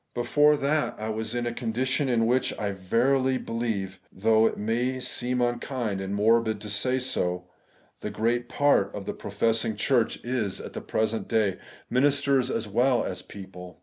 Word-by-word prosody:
Before 145 +5 +4
that, 145 +2 0
I 110 +1 -4
was 110 +1 -3
in 120 0 -1
a 120 - -2
condition 130 +4 -1
in 115 -2 +2
which 125 +3 +1
I 105 -2 -2
verily 130 +8 +1
be 115 - -7
lieve 100 -5 -2
(though 110 +3 +3
it - - -3
may 120 +5 -1
seem 125 0 -1
unkind 120 -4 -1
and 95 +1 -3
morbid 110 +1 +2
to 105 - -5
say 125 +6 +1
so) 90 -8 -1 0.5
the - - -4
great 115 +3 -1
part 145 -9 +2
of 100 -1 -6
the - - -3
professing 110 +2 -1
church 120 +2 +1
is 115 -6 -1
at - - -8
the - - -5
present 110 -1 -1
day, 105 -4 +1 0.3
ministers 140 0 +2
as 115 -3 -2
well 120 +4 +2
as - - -4
people. 90 -3 -11
115 Hz, 175 wpm, -26 LUFS, 105-125 Hz, 0.5 s, Before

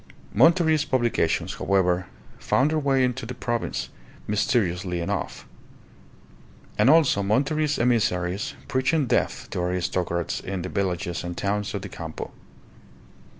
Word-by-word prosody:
Monterist 160 -3 +4
publications, 120 -10 +1
however, 90 -2 +1 0.3
found 140 +4 +2
their 155 - +1
way 135 -2 +2
into 125 -1 -1
the 125 - -6
province, 120 -1 -2 0.4
mysteriously 95 -4 0
enough; 85 - -3 1.3
and 105 +5 +4
also 155 -9 +5
Monterist 140 +9 +1
emissaries 100 -6 0
preaching 135 +3 +1
death - - 0
to - - -3
aristocrats 90 -1 -1
in 95 -2 -4
the 90 - -4
villages 90 -3 -2
and 85 0 -5
towns 105 +1 -1
of 100 - -4
the - - -6
Campo. 80 -1 -7
105 Hz, 120 wpm, -25 LUFS, 90-130 Hz, 1.3 s, also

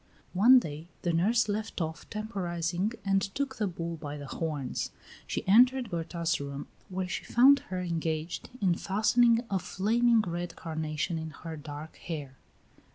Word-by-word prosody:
One 230 +8 +8
day 160 -7 -2 0.2
the 175 - +1
nurse 215 +8 +3
left 210 0 -3
off 160 -1 -4
temporizing 185 -2 -2
and 195 0 +3
took 265 +8 -3
the 215 -2 0
bull 170 -2 -4
by 150 -1 -6
the 145 - -7
horns. 140 -1 -3 0.4
She - - -3
entered 245 +3 +5
Berta's 170 0 -1
room, 140 0 -5 0.2
where 185 0 -2
she 180 - -3
found 275 +4 +6
her 185 -1 -2
engaged 165 -2 -2
in 185 -3 +4
fastening 230 +6 +3
a 195 - +2
flaming 230 +5 +3
red 175 -2 -4
carnation 160 0 -3
in 160 0 -5
her 160 +1 -8
dark 150 +1 -8
hair. 145 -6 -6
175 Hz, 155 wpm, -30 LUFS, 160-215 Hz, 0.4 s, One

